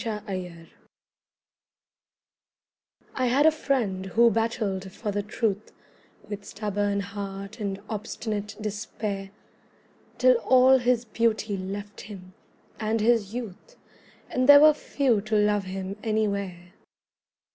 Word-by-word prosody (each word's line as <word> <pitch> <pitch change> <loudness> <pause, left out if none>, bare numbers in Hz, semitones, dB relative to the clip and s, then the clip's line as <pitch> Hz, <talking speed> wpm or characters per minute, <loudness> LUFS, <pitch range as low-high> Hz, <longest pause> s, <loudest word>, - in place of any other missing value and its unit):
MY 220 -2 -3
FRIEND 180 -4 -6 2.4
I 255 -1 0
had 270 +5 +3
a 315 - +7
friend 230 -11 -1
who 235 +4 +4
battled 215 -4 -1
for 210 +1 -4
the 205 0 -1
truth 210 0 -2 0.6
With 205 -1 -6
stubborn 205 -1 -2
heart 200 +1 -7
and 195 -2 -3
obstinate 210 -1 -4
despair, 205 -2 -4 0.9
Till 255 -1 +5
all 260 +2 +5
his 245 -1 +1
beauty 220 -2 0
left 200 +2 -6
him, 185 -3 -11 0.5
and 220 +1 0
his 220 -1 +2
youth, 245 - -7 0.6
And 255 +2 +1
there 285 0 +10
were 305 0 +8
few 265 -7 0
to 215 +1 -2
love 210 -1 +2
him 190 +1 -5
anywhere. 200 -5 -2
210 Hz, 115 wpm, -26 LUFS, 195-230 Hz, 2.4 s, there